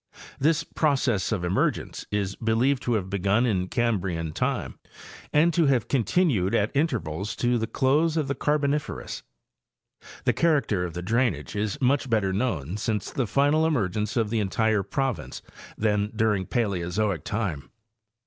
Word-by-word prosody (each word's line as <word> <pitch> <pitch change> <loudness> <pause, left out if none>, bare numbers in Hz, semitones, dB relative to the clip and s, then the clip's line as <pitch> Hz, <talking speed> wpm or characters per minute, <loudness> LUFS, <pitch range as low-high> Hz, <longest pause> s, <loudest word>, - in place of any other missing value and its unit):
This 155 +3 +2
process 135 -11 0
of 100 -5 -1
emergence 90 +3 -1
is 100 -2 -1
believed 120 +4 +1
to 120 - 0
have 95 -4 -1
begun 100 +5 +1
in 95 -6 0
Cambrian 90 -9 -1
time 105 - -2 0.5
and 165 +3 +4
to 165 -2 +3
have 130 -5 +2
continued 130 - +1
at 105 +6 0
intervals 105 - -1
to 120 0 +1
the 110 - -2
close 150 +7 +2
of 150 -3 0
the 140 - 0
Carboniferous. 150 0 -1 1.0
'The - - +2
character 135 - +1
of 85 -2 -7
the 90 - -4
drainage 110 - 0
is 105 +7 -2
much 135 0 +1
better 105 -4 +1
known 95 - -1
since 105 -2 -2
the 130 -4 -1
final 145 +6 +3
emergence 110 - 0
of 110 -2 +1
the 115 - +1
entire 105 +1 +1
province 100 - -3 0.3
than 105 -1 +1
during 105 -4 +1
Paleozoic 100 - -1
time. 100 -10 -3
110 Hz, 150 wpm, -26 LUFS, 95-135 Hz, 1.0 s, and